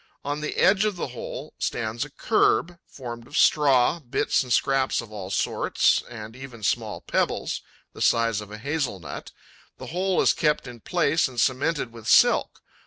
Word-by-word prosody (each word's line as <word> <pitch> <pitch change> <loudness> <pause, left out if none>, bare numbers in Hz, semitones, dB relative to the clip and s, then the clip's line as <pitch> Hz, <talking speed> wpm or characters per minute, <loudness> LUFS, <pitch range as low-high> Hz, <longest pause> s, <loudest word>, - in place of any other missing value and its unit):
On 145 +1 -2
the 150 - -4
edge 195 +1 +4
of 210 -2 0
the 170 - -4
hole 120 - -7
stands 110 +2 -2
a 145 - -8
kerb, 175 0 +1
formed 120 -3 -8
of 145 - -5
straw, 145 +1 +4
bits 140 0 0
and 125 -2 -6
scraps 135 +1 +2
of 115 -2 -7
all 100 -3 -7
sorts - - +1
and 110 -1 -9
even 130 -4 -10
small - - -1
pebbles, - - -1 0.3
the - - -10
size 115 -2 +2
of 105 - -10
a 105 - -7
hazel 140 -3 -2
nut. 80 - -8 0.5
The - - -9
whole 185 +1 +1
is - - +4
kept 150 -3 +1
in 120 -2 -9
place 165 +3 +1
and 125 -2 -6
cemented 130 0 0
with 115 -2 -11
silk. 100 - +4
130 Hz, 175 wpm, -25 LUFS, 115-150 Hz, 0.5 s, edge